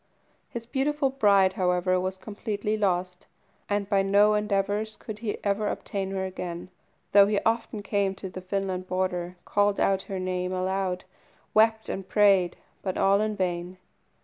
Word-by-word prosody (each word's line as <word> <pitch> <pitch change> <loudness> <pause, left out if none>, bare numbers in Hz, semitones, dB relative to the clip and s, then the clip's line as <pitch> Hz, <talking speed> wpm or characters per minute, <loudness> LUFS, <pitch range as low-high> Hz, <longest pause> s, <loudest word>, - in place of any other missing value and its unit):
His 230 -1 -6
beautiful 275 +2 0
bride, 200 -7 +4
however, 185 0 +1
was 185 +1 -3
completely 210 +1 -3
lost; 180 -3 -1 0.4
and 205 -1 0
by 195 -1 +3
no 200 +2 +4
endeavours 210 +1 0
could 215 -2 -8
he 220 -2 -3
ever 205 +1 0
obtain 195 -2 -3
her 190 -1 -2
again, 180 -1 -6 0.4
though 200 0 +7
he 205 -1 +1
often 225 -2 -1
came 200 -1 0
to 190 0 -6
the 185 0 -8
Finland 185 -1 -3
border, 180 -1 -2
called 205 0 +2
out 195 -1 +2
her 195 - -3
name 185 0 -2
aloud, 185 0 -1 0.5
wept 220 0 +4
and 190 -1 -5
prayed, 195 -4 +4 0.2
but 185 -2 -3
all 200 +1 +4
in 215 0 -1
vain. 180 -1 -2
195 Hz, 155 wpm, -27 LUFS, 185-210 Hz, 0.5 s, though